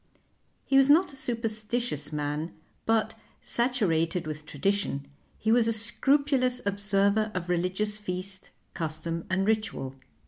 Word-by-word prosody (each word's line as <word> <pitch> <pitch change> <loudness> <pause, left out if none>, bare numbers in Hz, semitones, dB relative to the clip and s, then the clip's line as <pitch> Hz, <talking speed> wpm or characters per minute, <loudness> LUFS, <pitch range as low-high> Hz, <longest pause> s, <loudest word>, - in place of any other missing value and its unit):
He 270 - +3
was 270 0 +6
not 320 +1 +5
a - - -7
superstitious 230 - -2
man, 150 +2 -3 0.3
but, 220 -1 +2 0.3
saturated 180 -9 +1
with 155 0 -6
tradition, 150 -3 -1 0.3
he 220 - 0
was 230 -1 +4
a 230 - +3
scrupulous 255 +3 +2
observer 200 +1 +2
of 175 -1 -3
religious 185 +5 0
feast, 185 -1 -5 0.2
custom, 165 0 -4
and 190 +1 +1
ritual. 215 -11 -1
205 Hz, 125 wpm, -28 LUFS, 170-230 Hz, 0.3 s, was